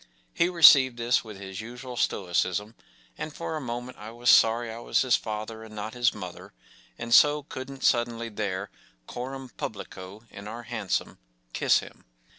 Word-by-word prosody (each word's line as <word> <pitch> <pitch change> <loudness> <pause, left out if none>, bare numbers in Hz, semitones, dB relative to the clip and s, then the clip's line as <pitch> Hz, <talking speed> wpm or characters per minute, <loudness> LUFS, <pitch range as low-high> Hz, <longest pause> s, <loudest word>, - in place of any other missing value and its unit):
” - - -37
He 170 - +2
received 140 -8 +7
this 120 +1 +1
with 105 -3 -10
his 95 0 -7
usual 125 +2 -8
stoicism, 95 +1 -1 0.5
and 155 - -4
for 160 +1 -5
a 155 - -4
moment 120 0 -6
I 105 +1 -8
was 120 +1 +2
sorry 115 +1 +4
I 115 - -7
was 120 - +1
his 130 -2 +4
father 110 +1 -5
and 110 -1 -12
not 110 +1 -5
his 120 -1 +2
mother, 90 -1 -9 0.4
and 115 0 -3
so 150 +3 +6
couldn’t 135 -1 -8
suddenly 120 -1 +1
there, 100 -2 -4 0.3
coram 130 - -6
publico, 100 0 -7
in 100 +1 -9
our 115 +3 -7
hansom, - - -3 0.3
kiss - - +3
him. - - -14
115 Hz, 170 wpm, -27 LUFS, 105-125 Hz, 0.5 s, received